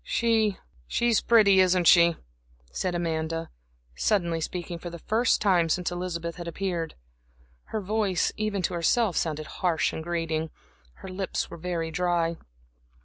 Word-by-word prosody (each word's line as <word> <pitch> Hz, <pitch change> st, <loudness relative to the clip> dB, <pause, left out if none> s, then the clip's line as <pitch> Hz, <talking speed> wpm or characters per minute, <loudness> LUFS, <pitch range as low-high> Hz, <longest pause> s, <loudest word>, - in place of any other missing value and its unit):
"She 220 Hz, -4 st, +1 dB, 0.3 s
she's 235 Hz, -, +2 dB
pretty 205 Hz, -5 st, +5 dB
isn't 185 Hz, -1 st, +4 dB
she," 170 Hz, -1 st, +6 dB, 0.6 s
said 180 Hz, -, -2 dB
Amanda, 165 Hz, -1 st, -2 dB, 0.4 s
suddenly 170 Hz, -, +1 dB
speaking 175 Hz, +1 st, -4 dB
for 175 Hz, -, -6 dB
the 170 Hz, -, -8 dB
first 225 Hz, +7 st, +1 dB
time 180 Hz, -5 st, +3 dB
since 180 Hz, +2 st, 0 dB
Elizabeth 170 Hz, -1 st, -4 dB
had 175 Hz, -1 st, -7 dB
appeared. 170 Hz, -2 st, -3 dB, 0.7 s
Her 220 Hz, -, -4 dB
voice, 200 Hz, -3 st, 0 dB
even 210 Hz, -3 st, -2 dB
to -, -, 0 dB
herself, 180 Hz, +4 st, +2 dB
sounded 155 Hz, -2 st, -1 dB, 0.2 s
harsh 165 Hz, -5 st, +1 dB
and -, -, -4 dB
grating. 165 Hz, -2 st, -2 dB, 0.6 s
Her -, -, -6 dB
lips 185 Hz, 0 st, -3 dB
were -, -, -7 dB
very 165 Hz, -1 st, -3 dB
dry. 170 Hz, 0 st, 0 dB
175 Hz, 145 wpm, -27 LUFS, 165-195 Hz, 0.7 s, she